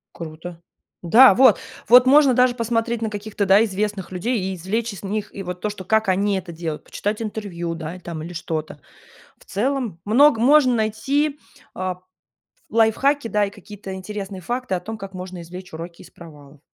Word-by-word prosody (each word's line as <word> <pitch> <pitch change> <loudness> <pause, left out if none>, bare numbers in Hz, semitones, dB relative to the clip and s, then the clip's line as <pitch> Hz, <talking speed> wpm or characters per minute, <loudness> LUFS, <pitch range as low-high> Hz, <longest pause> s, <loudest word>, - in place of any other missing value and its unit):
Круто. 165 +1 -9 0.4
Да, 225 +6 +8
вот 260 +2 +6 0.3
вот 250 +1 +8
можно 280 -1 +6
даже 250 0 +3
посмотреть 230 0 -1
на 220 - -1
каких-то, 205 -1 -3
да, 195 +2 +6
известных 200 -1 -3
людей 225 +6 -1
и 190 0 -3
извлечь 210 +6 -3
из 200 - -11
них, 205 +1 -4
и 195 - -5
вот 180 0 -6
то, 210 - -1
что 200 -2 -8
как 220 +2 +1
они 195 +1 +1
это 175 -2 -7
делают, 160 -2 -5
почитать 210 +2 -3
интервью, 190 -6 -4
да, 165 +2 -7
там 165 -3 -7
или 175 - -7
что-то. 155 -2 -5 0.6
В - - -21
целом, 235 -4 -2
много 255 +3 +5
можно 260 0 +5
найти, 275 +7 0 0.3
а, 185 -1 -3
п 180 - -26 0.7
лайфхаки, 230 +4 +2
да, 210 -2 +1
и 200 - -4
какие-то 200 -1 -10
интересные 195 0 -6
факты 240 0 -3
о 180 - -2
том, 220 +4 -6
как 195 -1 -8
можно 180 -1 -7
извлечь 180 +3 -10
уроки 170 +1 -8
из - - -15
провалов. 145 -4 -15
200 Hz, 185 wpm, -22 LUFS, 180-230 Hz, 0.7 s, Да